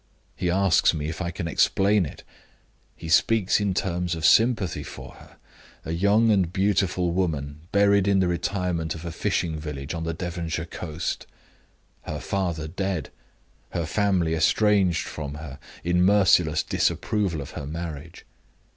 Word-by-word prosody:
He 90 Hz, -, -1 dB
asks 95 Hz, -2 st, +3 dB
me 75 Hz, 0 st, -3 dB
if 80 Hz, -, -5 dB
I 85 Hz, -, -2 dB
can 85 Hz, -1 st, -4 dB
explain 95 Hz, +2 st, +2 dB
it. -, -, -11 dB, 0.7 s
He -, -, -9 dB
speaks 100 Hz, +5 st, +3 dB
in 100 Hz, -3 st, 0 dB
terms 90 Hz, -2 st, -1 dB
of 80 Hz, -2 st, -3 dB
sympathy 110 Hz, -9 st, +3 dB
for 75 Hz, -, -9 dB
her -, -, -17 dB, 0.5 s
a -, -, -4 dB
young 100 Hz, +6 st, +3 dB
and 95 Hz, -5 st, +2 dB
beautiful 95 Hz, -2 st, +1 dB
woman, 75 Hz, -5 st, -2 dB
buried 100 Hz, -1 st, +4 dB
in 100 Hz, -1 st, +3 dB
the 95 Hz, -, +2 dB
retirement 85 Hz, -1 st, -1 dB
of 80 Hz, +1 st, -9 dB
a 85 Hz, -, -4 dB
fishing 80 Hz, 0 st, -1 dB
village 75 Hz, -1 st, -6 dB
on 85 Hz, -1 st, -4 dB
the 80 Hz, -1 st, -3 dB
Devonshire 85 Hz, -2 st, -4 dB
coast; 80 Hz, -2 st, -5 dB, 0.8 s
her -, -, -4 dB
father 85 Hz, -5 st, -2 dB
dead; 95 Hz, -1 st, -3 dB, 0.6 s
her 85 Hz, -, -1 dB
family 90 Hz, -2 st, +1 dB
estranged 95 Hz, +2 st, +2 dB
from 75 Hz, -2 st, -6 dB
her, 75 Hz, -2 st, -9 dB, 0.2 s
in 90 Hz, +1 st, +2 dB
merciless 90 Hz, -5 st, +4 dB
disapproval 100 Hz, -7 st, 0 dB
of 70 Hz, -, -7 dB
her 70 Hz, -, -6 dB
marriage. 85 Hz, +1 st, -7 dB
85 Hz, 150 wpm, -25 LUFS, 80-95 Hz, 0.8 s, buried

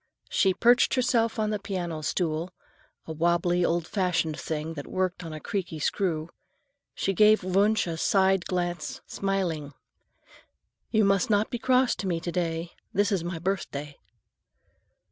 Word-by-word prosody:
As -, -, -5 dB
she 190 Hz, -2 st, +3 dB
perched 240 Hz, +2 st, +4 dB
herself 235 Hz, -3 st, +2 dB
upon 215 Hz, -1 st, -1 dB
the 210 Hz, -, -1 dB
piano 175 Hz, -5 st, -4 dB
stool,—a 165 Hz, +1 st, -5 dB
wobbly, 175 Hz, +2 st, +1 dB
old 170 Hz, -1 st, +1 dB
fashioned 170 Hz, -5 st, 0 dB
thing 160 Hz, +1 st, -3 dB
that 145 Hz, -3 st, -7 dB
worked 185 Hz, -1 st, -2 dB
on 165 Hz, -, -7 dB
a 155 Hz, -, -6 dB
creaky 180 Hz, -2 st, -4 dB
screw,—she 190 Hz, -, -4 dB
gave 215 Hz, +2 st, +5 dB
Wunsch 200 Hz, +4 st, +2 dB
a 165 Hz, -2 st, -4 dB
side 190 Hz, +1 st, +2 dB
glance, 175 Hz, -4 st, -3 dB
smiling. 175 Hz, -7 st, -2 dB, 1.2 s
"You 220 Hz, -2 st, +3 dB
must 195 Hz, 0 st, +2 dB
not 210 Hz, 0 st, +2 dB
be 240 Hz, -, -3 dB
cross 255 Hz, +1 st, +3 dB
to 195 Hz, -, -3 dB
me 170 Hz, -2 st, 0 dB
to 175 Hz, -, -4 dB
day. 170 Hz, -1 st, -2 dB, 0.2 s
This 205 Hz, +2 st, +1 dB
is 190 Hz, -4 st, 0 dB
my 175 Hz, 0 st, -4 dB
birthday." 160 Hz, -5 st, -4 dB
180 Hz, 145 wpm, -27 LUFS, 165-200 Hz, 1.2 s, gave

